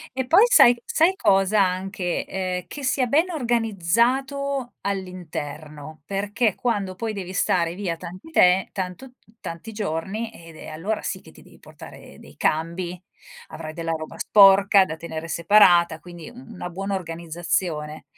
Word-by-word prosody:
E 260 -1 -2
poi 350 - +6
sai 245 - +7
sai 340 +4 +2
cosa 195 - +3
anche, 185 -1 -3
ehm, 185 -1 -3
che 290 - -8
sia 260 0 +1
ben 310 +9 +2
organizzato 245 - 0
all'interno 155 -6 -6
perché 205 +2 0
quando 205 -6 -2
poi 220 +3 -4
devi 190 -3 -6
stare 175 -2 0
via 185 -3 -3
tanti 180 - -10
te 185 - +4
tanto 190 +7 -6 0.3
tanti 170 +7 -8
giorni, 205 +2 -3
ed, 165 -1 -14
ehm, 155 - -9
allora 200 +8 -3
sì - - -4
che - - -16
ti - - -17
devi - - -19
portare - - -13
dei - - -15
cambi, 170 +3 -2 0.5
avrai 155 0 -8
della 165 -1 -3
roba 155 -1 -6
sporca, 195 -1 +6
da 160 -3 -6
tenere 165 0 -7
separata, 170 -1 +4
quindi 175 -3 -11
una 230 -6 -9
buona 195 +3 -3
organizzazione. 165 -2 -3
185 Hz, 145 wpm, -23 LUFS, 170-225 Hz, 0.5 s, sai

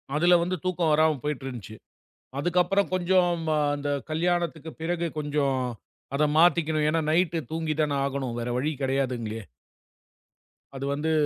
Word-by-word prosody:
அதுல 175 +3 +5
வந்து 180 +2 -1
தூக்கம் 175 -3 +1
வராம 155 0 +3
போயிட்டு 150 -3 -3
இருந்துச்சு. 115 -5 -7 0.6
அதுக்கப்புறம் 180 +5 +2
கொஞ்சம் 185 0 +3
ம், - - -5 0.3
அந்த 145 0 -3 0.2
கல்யாணத்துக்கு 165 -1 -1
பிறகு 170 +1 -1
கொஞ்சம் 145 -3 0 0.6
அதை 150 +2 +3
மாத்திக்கணும். 160 -3 +3
ஏன்னா 165 +1 +1
நைட்டு 170 0 +2
தூங்கித்தானே 155 -2 0
ஆகணும். 135 -3 -3
வேற 120 +1 -3
வழி 145 +5 0
கிடையாதுங்களே. 125 -5 -1 1.3
அது 135 +1 -4
வந்து 150 +3 -1
155 Hz, 130 wpm, -26 LUFS, 140-175 Hz, 1.3 s, அதுல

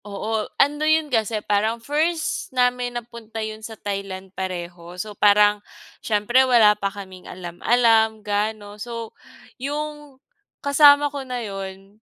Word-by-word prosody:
Oo, 215 +2 -3
ano 295 +2 +2
yun 310 -2 +2
kasi 220 -1 0
parang 215 +3 +1
first 310 +6 -1
namin 250 -1 +1
na 240 - -6
punta 230 -2 -11
yun 215 0 -7
sa 220 0 -8
Thailand 195 -2 -5
pareho. 175 -2 -6
So, 210 +3 -5
parang 205 0 +4 0.4
siyempre 220 +4 +2
wala 235 -5 +6
pa 200 -1 -2
kaming 190 -2 -11
alam 175 -1 -9
alam 225 -2 +3
gaano. 205 0 -2
So, 230 -1 -6 0.5
yung 295 0 -5 0.5
kasama 285 0 +6
ko 285 - -4
na 250 -3 -5
yun 195 0 -8
220 Hz, 140 wpm, -22 LUFS, 200-250 Hz, 0.5 s, wala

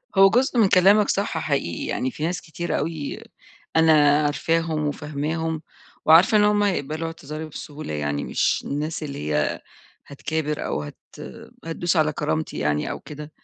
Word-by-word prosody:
هو 195 0 +7
جزء 250 +4 +1
من 215 - +6
كلامك 200 +3 +5
صح 200 -4 0
حقيقي 140 - -2
يعني 130 - -2
في 150 - -7
ناس 175 +1 -2
كتير 170 +1 -3
أوي 150 -1 -4 0.6
أنا 155 -2 +5
عارفاهم 160 +1 0
وفاهماهم 155 +2 -3 0.4
وعارفة 165 +7 +6
إن 205 - +5
هُم 210 0 +3
هيقبَلوا 160 -4 -1
اعتذاري 155 -1 -7
بسهولة 150 - -8
يعني، 75 -1 -2
مش - - 0
الناس 155 +3 -3
اللي 140 -2 -5
هي 75 0 0 0.5
هتكابر 150 +1 -3
أو - - -2
هت 75 - -9 0.7
هتدوس 165 +2 -1
على 155 -1 +3
كرامتي 80 -10 -2
يعني 75 0 0
أو - - -5
كده. 150 0 -9
155 Hz, 150 wpm, -23 LUFS, 145-165 Hz, 0.7 s, هو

